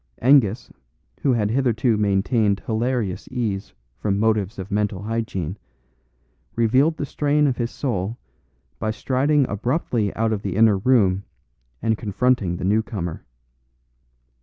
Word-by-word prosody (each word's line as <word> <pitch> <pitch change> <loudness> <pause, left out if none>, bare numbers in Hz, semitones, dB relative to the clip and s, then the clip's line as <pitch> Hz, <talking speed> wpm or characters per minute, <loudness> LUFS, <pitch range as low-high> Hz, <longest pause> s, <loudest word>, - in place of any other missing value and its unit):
Angus, 125 -4 +3 0.5
who 135 - +3
had 105 -3 0
hitherto 120 -2 +2
maintained 105 0 +1
hilarious 115 -4 -1
ease 110 -6 -3 0.3
from 100 -2 0
motives 110 -1 +1
of 95 +2 -7
mental 105 -1 -1
hygiene, 105 -5 -3 1.0
revealed 130 +8 +3
the 145 - -2
strain 150 +1 +1
of 130 -4 +1
his 120 -1 -1
soul 115 -5 -3 0.6
by 110 - -1
striding 135 +5 +1
abruptly 115 - -1
out 110 0 +1
of 105 - -3
the 95 -3 -3
inner 110 -2 +4
room 100 -5 +3 0.6
and 110 -1 +1
confronting 105 -4 0
the 90 - -4
new 105 +3 +3
comer. 90 -7 -5
110 Hz, 130 wpm, -22 LUFS, 100-125 Hz, 1.0 s, inner